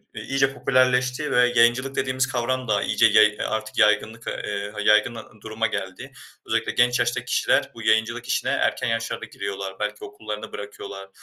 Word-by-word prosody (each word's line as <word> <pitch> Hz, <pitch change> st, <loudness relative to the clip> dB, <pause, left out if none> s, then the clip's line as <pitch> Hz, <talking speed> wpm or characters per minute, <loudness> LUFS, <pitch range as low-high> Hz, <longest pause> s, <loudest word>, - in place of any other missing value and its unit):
eee, -, -, -6 dB
iyice 135 Hz, 0 st, 0 dB
popülerleşti 130 Hz, +2 st, +1 dB
ve 125 Hz, 0 st, +4 dB
yayıncılık 120 Hz, +3 st, +3 dB
dediğimiz 130 Hz, 0 st, 0 dB
kavram 130 Hz, 0 st, -2 dB
da 105 Hz, -2 st, +1 dB
iyice 115 Hz, -, +3 dB
yay 110 Hz, -1 st, +7 dB
eee, 105 Hz, 0 st, -8 dB
artık 110 Hz, 0 st, -4 dB
yaygınlık 110 Hz, +2 st, +2 dB
ve, -, -, -1 dB, 0.2 s
eee, 100 Hz, 0 st, -4 dB
ha 105 Hz, -, -7 dB
yaygın 105 Hz, +3 st, +3 dB
a 115 Hz, -, -8 dB, 0.2 s
duruma 110 Hz, +1 st, -2 dB
geldi. 95 Hz, -3 st, -6 dB, 0.3 s
Özellikle -, -, -1 dB
genç 120 Hz, +1 st, +2 dB
yaştaki 120 Hz, 0 st, -1 dB
kişiler -, -, +1 dB
bu 115 Hz, -, -9 dB
yayıncılık 110 Hz, 0 st, +1 dB
işine -, -, 0 dB
erken -, -, 0 dB
yaşlarda 115 Hz, 0 st, -2 dB
giriyorlar, 100 Hz, -3 st, -6 dB
belki 105 Hz, 0 st, -4 dB
okullarını 110 Hz, -6 st, -7 dB
bırakıyorlar. 100 Hz, -1 st, -8 dB
115 Hz, 175 wpm, -23 LUFS, 105-125 Hz, 0.3 s, yay